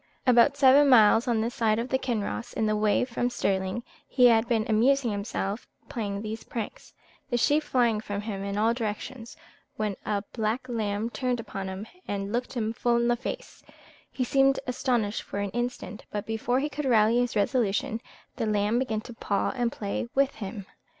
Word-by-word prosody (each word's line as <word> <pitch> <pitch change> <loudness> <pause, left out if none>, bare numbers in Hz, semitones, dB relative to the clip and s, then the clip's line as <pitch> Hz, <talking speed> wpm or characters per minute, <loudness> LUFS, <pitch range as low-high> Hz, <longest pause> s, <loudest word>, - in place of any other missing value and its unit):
"About 250 +2 +5
seven 280 +1 +6
miles 225 -1 +6
on 230 -2 +2
this 230 +2 -2
side 220 -2 +1
of 235 +2 -2
Kinross, 235 0 -3
in 220 - 0
the 215 0 +1
way 210 +2 +2
from 245 0 -1
Stirling, 190 0 -1 0.2
he 250 -1 +4
had 230 -1 +5
been 225 -3 +1
amusing 240 +3 +3
himself 200 +1 -3 0.2
playing 205 -3 -3
these 220 +1 -5
pranks, 225 -3 -6 0.4
the 240 - +1
sheep 290 +6 +3
flying 240 -7 +1
from 205 -2 -4
him 205 -2 -5
in 200 0 -3
all 225 +2 +3
directions, 235 +1 -5 0.4
when 210 -2 -2
a 200 -1 -1
black 225 +3 -1
lamb 220 -1 -2
turned 250 -2 -1
upon 195 -4 -5
him, 190 +2 -6 0.2
and 200 0 -3
looked 245 +1 -2
him 225 -3 -1
full 240 +1 +1
in 235 0 +2
the 240 - +3
face; 265 - -7 0.5
he 255 - -2
seemed 270 +2 +3
astonished 240 -4 0
for - - -7
an 200 -1 -2
instant, 240 -2 -4
but 205 0 -4
before 225 +3 0
he 295 - 0
could 295 0 -5
rally 230 -1 +4
his 245 -1 0
resolution, 220 0 0 0.4
the 225 - -1
lamb 210 +2 +1
began 220 -5 -1
to 240 - -10
paw 205 -3 -1
and 240 -2 0
play 205 +1 -3
with 275 0 +3
him. 200 -1 -6
230 Hz, 185 wpm, -27 LUFS, 210-245 Hz, 0.5 s, seven